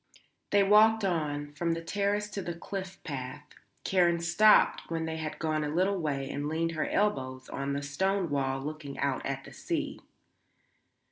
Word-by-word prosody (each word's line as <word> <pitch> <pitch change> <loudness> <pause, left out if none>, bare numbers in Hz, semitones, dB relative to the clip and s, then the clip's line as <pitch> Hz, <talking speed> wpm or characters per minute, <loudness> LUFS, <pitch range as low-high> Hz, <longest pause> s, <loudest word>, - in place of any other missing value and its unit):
They 205 -1 +4
walked 215 +1 +5
on, 145 -5 -1
from 170 +3 0
the 165 0 -4
terrace 205 +3 0
to 200 - -3
the 175 -2 -4
cliff 190 +2 -6
path. 135 0 -5 0.4
Karen 175 -2 +3
stopped 170 +6 +4
when 165 -1 -2
they 160 0 -3
had 155 -1 -4
gone 155 -1 0
a 150 - -2
little 185 +5 +1
way 140 -4 -2
and 145 +1 -3
leaned 165 +1 0
her 160 -2 -2
elbows 130 -11 0
on 140 0 -3
the 140 0 -2
stone 190 +5 0
wall 135 -1 0
looking 150 -1 -6
out 140 -2 -1
at 135 0 -3
the - - -12
sea. - - -3
160 Hz, 175 wpm, -30 LUFS, 145-190 Hz, 0.4 s, walked